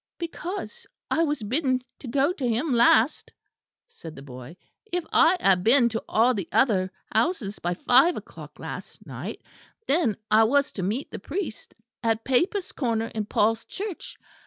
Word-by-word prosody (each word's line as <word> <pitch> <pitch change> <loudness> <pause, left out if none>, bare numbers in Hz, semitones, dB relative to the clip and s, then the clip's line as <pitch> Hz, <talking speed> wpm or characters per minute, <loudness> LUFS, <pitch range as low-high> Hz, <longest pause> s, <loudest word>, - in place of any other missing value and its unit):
"Because 370 +7 -6 0.2
I 325 - +2
was 295 -7 0
bidden 255 +2 0 0.2
to 270 - -9
go 275 +7 +2
to 265 -7 -3
him 245 +5 0
last," 235 +2 +3 0.6
said 160 -2 -11
the 135 - -10
boy. 130 +4 -10 0.3
"If 355 -2 -1
I 330 +3 +5
had 185 - +3
been 240 +2 +5
to 225 -1 -4
all 235 +3 +4
the 195 -7 -4
other 190 -8 +2 0.2
houses 220 - 0
by 175 +1 -2
five 265 - +4
o'clock - - -11
last - - -8
night, - - -7 0.4
then 280 - +2
I 220 +1 +6
was 280 +4 +2
to 195 - -5
meet 215 +10 -2
the - - -6
priest 330 - -6 0.3
at 225 -1 0
Papists' 350 - +1
Corner 230 -4 -1
in 215 -1 -2
Paul's 225 +2 +1
Church. 395 -3 -7
245 Hz, 160 wpm, -25 LUFS, 215-315 Hz, 0.6 s, I